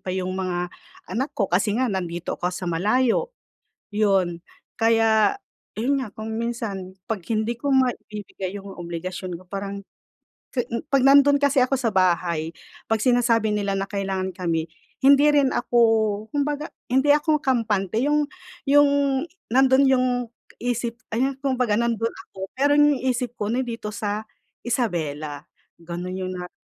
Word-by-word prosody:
pa - - -10
'yong 185 0 -2
mga 180 -1 -2 0.4
anak 265 +6 -2
ko 205 - +2
kasi 205 +3 +2
nga 255 - +2
nandito 175 -2 -3
ko 175 - 0
sa 180 0 -5
malayo. 230 - +2 0.6
'Yon, 190 -5 +1 0.4
kaya 225 - +4 0.5
'yon 270 +2 +1
nga, 210 - -10
kung 220 0 -5
minsan 225 -5 -4 0.2
'pag 220 -5 -2
hindi 225 +2 0
ko 280 +3 -1
maibibigay 210 -7 -1
'yong 200 -1 -8
obligasyon 175 +1 -5
ko - - -16
parang, 200 0 -5 0.7
ke 245 -3 -2 0.2
'pag 275 -3 +3
nandun 280 +1 +7
kasi 280 -2 +3
ako 260 +1 +2
sa 230 -4 -1
bahay, 170 -3 +1 0.4
'pag 225 - +3
sinasabi 235 -4 +3
nila 200 -1 0
na 195 - -1
kailangan 195 -2 -3
kami, 165 -4 -1 0.4
hindi 280 +1 +7
rin 280 -2 +4
ako, 240 - +1 0.5
kumbaga, 290 +1 -1 0.2
hindi 265 +3 +4
ako 300 +1 +2
kampante, 220 -5 +1
'yong 295 +2 +2 0.4
'yong, 285 +1 +5 0.6
nandoon 265 +1 +5
'yong 255 -1 +3 0.5
isip 240 -1 -2 0.2
ay 265 +3 0
kumbaga 255 -6 +1
nandoon 230 -1 0 0.2
ako 190 - -14 0.2
pero 285 +2 +3
'yong 295 -1 +5
isip 250 -1 0
ko 205 0 -2
nandito 235 -4 -3
sa 210 0 -3 0.4
Isabela. 155 - -2 0.4
Ganon 175 +2 -5
yung 185 0 -3
nara 180 0 -6
225 Hz, 145 wpm, -24 LUFS, 190-260 Hz, 0.7 s, nandun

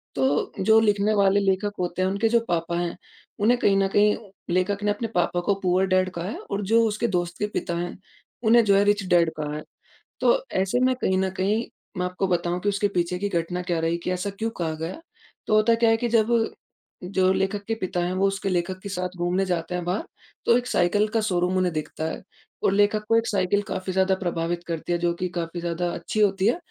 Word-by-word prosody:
तो 135 +2 +1
जो 220 +3 +5
लिखने 210 0 +2
वाले 200 0 +4
लेखक 195 +1 +1
होते 180 0 -2
हैं 185 - +2
उनके 200 +3 +1
जो 235 +1 +4
पापा 170 0 -1
हैं 175 -1 -2 0.4
उन्हें 230 +4 +4
कहीं 195 -3 +3
न 195 0 +3
कहीं 210 0 +5 0.4
लेखक 200 +3 0
ने 205 - +2
अपने 220 +3 -2
पापा 175 0 +1
को 200 - +4
पूअर 185 +1 +3
डैड 185 0 +2
कहा 170 - -3
है - - -5
और 200 +1 -1
जो 230 0 +5
उसके 215 +2 -1
दोस्त 175 0 -3
के 210 - 0
पिता 170 - -2
हैं 175 +1 -4 0.5
उन्हें 235 +1 +6
जो 200 - +4
है 200 - +5
रिच 205 0 +2
डैड 170 -2 +4
कहा 150 -1 -3
है। 155 - -6 0.6
तो - - +5 0.2
ऐसे 195 +6 0
में 255 0 +2
कहीं 185 - +2
न 190 0 +1
कहीं 210 +4 +1 0.3
मैं 180 - 0
आपको 180 +2 -2
बताऊँ 175 0 0
कि 205 - +1
उसके 205 0 +1
पीछे 175 +1 0
की 205 +1 -1
घटना 175 0 -2
क्या 175 -2 -1
रही 165 +1 0
कि - - -1
ऐसा 185 +2 -2
क्यों 225 +1 0
कहा 160 -2 -1
गया? 165 - -6 0.5
तो 215 - +3
होता 215 +2 +4
क्या 230 0 +3
है 225 - +3
कि 240 - -1
जब 230 +1 +3 0.7
जो 185 0 +2
लेखक 195 +2 -1
के 225 - 0
पिता 185 -4 -3
हैं 180 - -2
वो 195 +1 +2
उसके 195 0 -2
लेखक 180 +1 -1
के 200 - -5
साथ 180 -1 -4
घूमने 175 +2 0
जाते 180 -1 -2
हैं 180 - -2
बाहर 180 - -1 0.4
तो 235 - +5
1 245 0 -3
साइकिल 205 +3 +2
का 225 - +3
शोरूम 180 -2 0
उन्हें 180 -2 +1
दिखता 155 0 -4
है 160 - -4 0.4
और - - +3
लेखक 205 +1 +2
को 225 - +5
1 230 - +1
साइकिल 200 0 +1
काफ़ी 185 0 -3
ज़्यादा 190 0 +3
प्रभावित 170 -2 -2
करती 165 0 -4
है - - +2
जो 175 0 +1
कि 185 - -2
काफ़ी 170 0 -3
ज़्यादा 170 +1 -2
अच्छी 170 +5 -4
होती 195 -1 +3
है। 240 - +2
190 Hz, 235 wpm, -24 LUFS, 175-205 Hz, 0.7 s, उन्हें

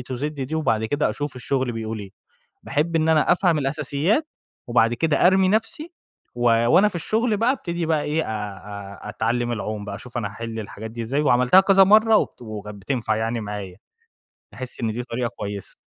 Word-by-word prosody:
to 125 +1 -6
Z - - -2
دي، 150 0 -4
وبَعد 115 -8 +1
كده 145 +6 0
أشوف 145 -2 -5
الشغل 130 0 -1
بيقول 110 -1 -4
إيه، 100 -2 -9 0.5
باحب 165 +3 -1
إن 160 0 +2
أنا 155 0 +4
أفهم 175 -3 +3
الأساسيات 150 - 0 0.4
وبعد 120 -1 +3
كده 160 +5 +3
أرمي 190 0 +4
نفْسي، 225 - -1 0.4
و 120 - -3 0.2
وأنا 195 +11 +5
في 195 - -4
الشغل 215 +5 0
بقى 235 +4 +3
أبتدي 170 -10 -3
بقى 155 -2 +1
إيه 155 +2 0
أ - - -8
أ 100 -1 -7
أتعلّم 120 +3 -1
العوم 105 -2 -4
بقى، 100 - -5
أشوف 120 +2 -8
أنا 105 -4 -1
هاحل 115 +1 -6
الحاجات 110 +1 -7
دي 115 +1 -6
إزاي، 135 +6 -1
وعملتها 125 +5 +5
كذا 195 0 +6
مَرّة 215 +2 +6
وبت - - -3 0.2
كانت 105 - -7
بتنفع 115 -2 -1
يعني 115 +1 -2
معايا، 100 -3 -6 0.8
أحس 130 -1 -7
إن 115 -2 0
دي 120 +2 -4
طريقة 120 0 -3
كويسة. 100 -1 -6
125 Hz, 190 wpm, -23 LUFS, 110-165 Hz, 0.8 s, كذا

